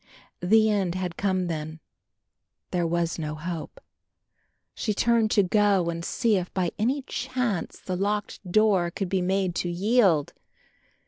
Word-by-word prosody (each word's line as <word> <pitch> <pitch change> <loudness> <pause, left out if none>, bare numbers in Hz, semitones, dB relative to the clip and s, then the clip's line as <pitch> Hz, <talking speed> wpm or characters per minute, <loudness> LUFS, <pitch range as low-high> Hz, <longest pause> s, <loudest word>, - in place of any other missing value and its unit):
The 220 +4 +4
end 195 -5 0
had 180 -2 -3
come 185 -2 0
then; 160 -1 -4 0.9
there 175 -2 0
was 170 0 -1
no 155 -1 -3
hope. 170 - -6 0.9
She 210 -2 -2
turned 230 0 +3
to 205 - +4
go 195 -2 +2
and 170 0 -5
see 225 +3 +1
if 180 -1 -4
by 180 -3 0
any 260 +6 0
chance 250 -8 -3
the 185 - -4
locked 205 +3 -2
door 200 -4 +3
could 185 +2 -4
be 190 -1 +1
made 190 0 0
to 175 - -1
yield. 185 - +2
185 Hz, 145 wpm, -26 LUFS, 170-210 Hz, 0.9 s, The